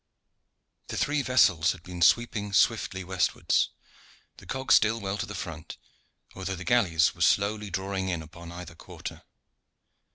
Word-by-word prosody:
The - - -5
three 145 0 +1
vessels 95 - +3
had 90 -3 -14
been 90 -1 -8
sweeping 105 +1 +2
swiftly 95 -1 +2
westwards, 95 0 +1 0.7
the - - -15
cog 130 0 -3
still 110 +2 +5
well 100 -2 -3
to 100 - -4
the 100 - -7
front, 80 -4 -7 0.6
although 95 0 -4
the 90 - -7
galleys 95 -10 +3
were - - -13
slowly 105 +1 +2
drawing 95 0 -3
in 85 -3 -2
upon 85 +2 -11
either 90 0 -9
quarter. 80 - -9
95 Hz, 150 wpm, -27 LUFS, 85-105 Hz, 0.7 s, still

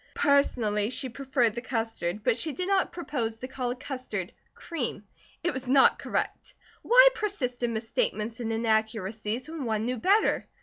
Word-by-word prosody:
Personally, 225 -7 +2
she 260 +1 0
preferred 255 -3 0
the 240 - -4
custard, 225 -6 -2
but 250 -2 +3
she 290 +6 -1
did 365 +3 -3
not 390 -1 +2
propose 250 -10 -3
to 255 - -6
call 255 -2 -3
it 250 +1 -4
custard 250 -9 -5 0.2
cream. 255 - -4 0.4
It 350 - +1
was 260 0 -5
not 270 +1 +5
correct. - - -3 0.3
Why - - +7
persist 385 - -3
in 240 -1 0
misstatements 220 0 -2
and 225 -2 -2
inaccuracies 220 0 -1
when 320 -2 -5
one 220 -1 -1
knew 250 +1 -1
better? 400 - +2
245 Hz, 165 wpm, -28 LUFS, 220-280 Hz, 0.4 s, Why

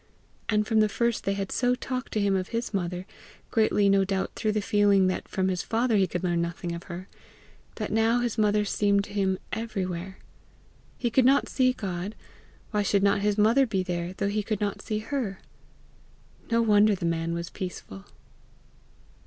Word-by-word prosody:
And 210 -1 +2
from 220 -1 +2
the 215 0 +4
first 235 +2 -1
they 195 - +1
had 195 -1 -4
so 250 -1 +2
talked 255 0 -5
to 215 - +1
him 200 -1 +2
of 185 -1 -1
his 230 -1 -3
mother, 180 -1 -2 0.5
greatly 215 -2 +3
no 195 0 +4
doubt 190 0 -1
through 215 -2 -1
the 215 - +1
feeling 205 -2 +3
that 185 - -1
from 190 -1 -1
his 185 -2 0
father 230 0 +1
he 195 -2 +3
could 180 +1 -4
learn 175 -2 +1
nothing 170 0 -3
of 170 +1 -7
her, 180 +1 -7 0.7
that 215 - -4
now 225 +2 +3
his 240 -2 -1
mother 210 -1 +2
seemed 200 0 +2
to 205 - -10
him 190 -2 +1 0.2
everywhere: 190 -4 -4 0.8
he 240 -2 -1
could 260 +3 +4
not 270 +3 +4
see 255 -1 +3
God; 195 -3 -4 0.6
why 210 -2 +1
should 200 0 +2
not 200 0 +3
his 205 0 +1
mother 230 +6 +4
be 195 -4 0
there 175 -1 -3
though 200 - -2
he 210 +1 0
could 210 0 -3
not 205 -1 -2
see 215 -2 -3
her! 220 -3 -3 1.1
No 230 0 +3
wonder 210 -1 +5
the 175 - -4
man 165 0 -1
was 170 0 -5
peaceful! 135 - -7
205 Hz, 190 wpm, -27 LUFS, 185-220 Hz, 1.1 s, wonder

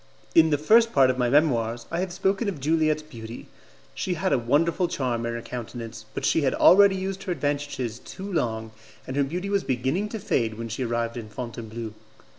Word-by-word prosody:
In 160 -1 +6
the 145 - +2
first 225 +10 +4
part 135 -2 +5
of 130 - -5
my 125 -1 +2
Memoirs 120 -5 +2
I 165 - -1
have 185 0 -2
spoken 195 +4 0
of 180 - -5
Juliette's 155 +1 +1
beauty; 115 -5 -9 0.5
she 180 - -2
had 185 +3 0
a 135 - +3
wonderful 165 +9 +2
charm 120 -7 -2
in 115 - -2
her 115 - -5
countenance, 115 -1 -7
but - - -2
she 160 - +3
had 135 -3 +1
already 200 +1 +7
used 190 0 -3
her 185 - -2
advantages 145 -7 -2
too 190 - -9
long, 110 -7 -1 0.3
and 130 - -5
her 140 - +3
beauty 180 +8 -3
was 200 -1 +1
beginning 130 - -1
to 220 - -4
fade 115 - 0
when 115 0 -5
she 115 +4 -3
arrived 115 0 -2
in 110 -2 -7
Fontainebleau. 115 -1 -6
135 Hz, 205 wpm, -25 LUFS, 115-175 Hz, 0.5 s, already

